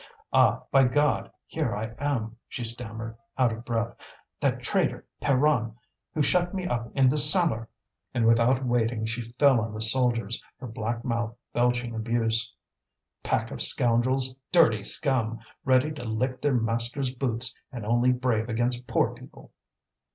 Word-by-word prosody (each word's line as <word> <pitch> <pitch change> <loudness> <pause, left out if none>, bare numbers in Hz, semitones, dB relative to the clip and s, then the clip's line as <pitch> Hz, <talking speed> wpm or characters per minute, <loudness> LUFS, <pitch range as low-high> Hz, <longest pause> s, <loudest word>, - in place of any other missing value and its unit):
"Ah! - - +3
by 135 -1 +5
God! 145 +4 0 0.2
here 145 -9 -3
I 110 +2 -5
am," 120 -6 -2
she 120 - -5
stammered, 115 -1 -6 0.2
out 125 -3 +2
of 115 +1 -9
breath; 115 -1 -3 0.4
"that - - -1
traitor - - -1 0.2
Pierron, 130 -5 +1 0.4
who 155 - +1
shut 175 +5 +1
me 185 -1 -3
up 120 -7 -3
in 135 -2 +4
the 150 +4 +3
cellar!" 150 - +6 0.4
And 120 -2 0
without 120 +3 +3
waiting 115 -2 -1
she 115 +2 -4
fell 120 +2 +2
on 110 0 -5
the - - -6
soldiers, 115 -1 +3
her - - -10
black 115 0 -5
mouth 115 -1 -2 0.2
belching 120 0 0
abuse. 115 0 -1 0.7
"Pack - - -2
of - - -2
scoundrels! 130 +2 +4 0.2
dirty 135 - +4
scum! 115 0 +1 0.3
ready 130 +3 +2
to 150 -5 -8
lick 125 +3 -3
their 145 -3 +1
masters' 120 +3 -1
boots, 125 -1 -2 0.2
and 120 -5 -7
only 120 +3 +2
brave 125 -3 -1
against 120 +2 -1
poor - - 0
people!" - - -15
120 Hz, 150 wpm, -26 LUFS, 115-130 Hz, 0.7 s, cellar